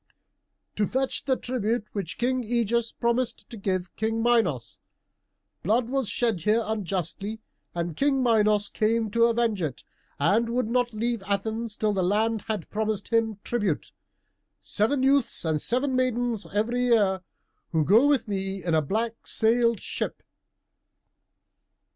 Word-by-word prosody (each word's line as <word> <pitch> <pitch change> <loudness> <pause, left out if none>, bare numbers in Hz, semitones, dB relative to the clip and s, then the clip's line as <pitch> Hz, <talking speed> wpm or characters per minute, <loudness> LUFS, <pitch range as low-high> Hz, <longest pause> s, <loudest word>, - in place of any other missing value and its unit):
"To 210 - +2
fetch 265 +1 -1
the 265 - +2
tribute 235 -2 -1
which 170 -7 -4
King 255 +1 0
Ægeus 235 0 0
promised 235 +1 -1
to 190 -5 -2
King 225 +1 -1
Minos. 230 - +1 0.8
Blood 225 +6 +1
was 265 -4 -1
shed 225 -8 0
here 215 +6 +2
unjustly, 195 0 -3 0.4
and 170 -2 -3
King 270 - +2
Minos 215 -3 +3
came 220 0 0
to 230 +2 +4
avenge 230 -4 +1
it, 145 -6 -3 0.3
and 205 +11 +2
would 245 -1 0
not 245 -2 +1
leave 230 0 -1
Athens 220 +2 -2
till 215 -1 +1
the 195 - 0
land 215 +4 +1
had 215 -6 -3
promised 215 -1 -2
him 225 -2 +1
tribute 205 -10 -1 0.7
seven 255 +6 +1
youths 270 -8 +2
and 155 -2 0
seven 255 +2 +1
maidens 245 -3 0
every 225 +4 0
year, 205 -6 +3 0.5
who 160 -2 +1
go 225 - +5
with 280 -6 +2
me 195 -2 -3
in 170 -1 -1
a 160 - +4
black 225 +9 -3
sailed 230 0 +2
ship." - - -4
220 Hz, 140 wpm, -26 LUFS, 200-240 Hz, 0.8 s, go